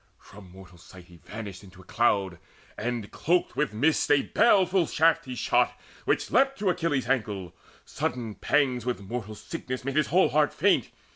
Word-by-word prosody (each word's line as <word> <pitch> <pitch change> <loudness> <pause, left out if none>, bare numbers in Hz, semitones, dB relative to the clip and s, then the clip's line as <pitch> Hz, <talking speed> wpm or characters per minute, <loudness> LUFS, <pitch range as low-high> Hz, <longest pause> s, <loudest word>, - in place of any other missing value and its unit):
From 95 -2 -15
mortal 90 -1 -15
sight 90 +1 -14
he 90 -1 -17
vanished 100 +2 -9
into 95 -1 -15
cloud, 95 -4 0 0.4
And 115 -2 -4
cloaked 175 +3 0
with 150 - 0
mist 145 +9 +1
a 145 -1 +4
baleful 190 -6 +3
shaft 160 -1 +2
he 130 -1 -6
shot - - +1 0.3
Which - - 0
leapt 270 +1 +3
to 200 -6 +1
Achilles' 160 -6 -1
ankle: 105 -8 -2 0.3
sudden 120 -3 -4
pangs 125 +4 +1
With 125 -2 -2
mortal 110 +1 -6
sickness 130 -1 -6
made 135 +1 -2
his 155 - +3
whole 185 +4 +3
heart 150 -1 +1
faint. - - +2
125 Hz, 165 wpm, -27 LUFS, 100-150 Hz, 0.4 s, a